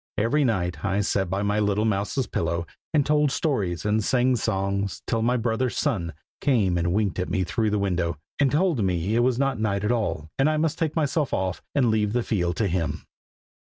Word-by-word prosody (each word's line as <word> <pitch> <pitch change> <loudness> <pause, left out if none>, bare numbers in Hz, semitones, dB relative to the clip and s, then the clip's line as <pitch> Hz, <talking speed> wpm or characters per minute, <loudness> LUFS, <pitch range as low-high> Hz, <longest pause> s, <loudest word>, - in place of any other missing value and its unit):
Every 120 +8 +2
night 95 -8 -1
I 100 0 +1
sat 95 -2 0
by 95 +2 -1
my 105 +1 +1
little 105 +1 +1
mouse's 105 +5 0
pillow, 85 -2 -2 0.3
and 150 -3 +2
told 150 -1 +3
stories 105 - -1
and 105 +1 +1
sang 125 +2 +2
songs, 100 -3 -1
till 115 -1 0
my 125 +2 +2
brother 120 +2 0
Sun 95 - -1 0.3
came 110 -11 +2
and 85 0 0
winked 100 -1 0
at 90 - -2
me 95 +1 0
through 110 +4 0
the 105 - 0
window, 90 -5 -1 0.2
and 140 -3 +3
told 155 - +2
me 90 +2 0
it - - +3
was 120 0 +2
not 135 -3 0
night 100 -2 0
at 105 - +1
all, 105 -10 -2
and 135 +3 +4
I 155 - +1
must 160 +1 0
take 160 -3 -1
myself 150 -2 0
off 95 -1 -2
and 125 -5 +3
leave 105 -1 +1
the 120 -1 +1
field 90 -6 0
to 110 - +1
him. 85 -2 -2
105 Hz, 210 wpm, -25 LUFS, 95-130 Hz, 0.3 s, and